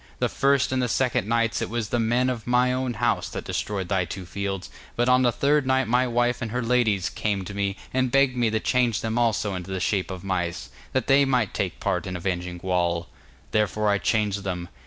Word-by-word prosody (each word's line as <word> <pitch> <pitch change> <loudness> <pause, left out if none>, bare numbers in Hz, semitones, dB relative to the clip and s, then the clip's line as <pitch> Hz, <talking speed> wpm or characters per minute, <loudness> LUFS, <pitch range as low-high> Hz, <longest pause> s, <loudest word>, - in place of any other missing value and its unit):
The - - 0
first 140 -1 +2
and 130 0 +1
the 125 - +1
second 120 -4 0
nights 115 0 +1
it - - -2
was 115 -2 -2
the 120 - 0
men 120 +3 +2
of 120 -2 -6
my 125 +1 +3
own 130 -1 -2
house 120 +2 0
that - - -5
destroyed 100 -3 -3
thy 95 -1 +1
two 90 +2 -6
fields, 95 +1 -4 0.2
but 120 +1 +1
on 125 0 +5
the 125 -1 +4
third 140 +3 +2
night 130 -1 +2
my 125 +2 +2
wife 120 +1 +1
and 115 - -2
her 125 +2 -2
ladies 115 -6 +2
came 100 -1 -2
to 100 - -7
me 100 -1 -1 0.2
and 130 0 +1
begged 135 -1 +3
me 120 -2 +2
to 110 0 0
change 120 -2 +1
them 115 +1 -1
also 110 -3 +1
into 90 0 -6
the 95 -1 -2
shape 95 0 0
of 95 -2 -6
mice, 90 -3 -3 0.2
that 130 - +1
they 140 +1 +5
might 125 -6 +1
take - - -2
part - - -1
in 90 - -4
avenging 90 0 -3
Gwawl. 85 -2 -1 0.4
Therefore 105 0 +1
I 100 -1 +2
changed 105 0 0
them. 90 -2 -4
110 Hz, 225 wpm, -25 LUFS, 95-125 Hz, 0.4 s, on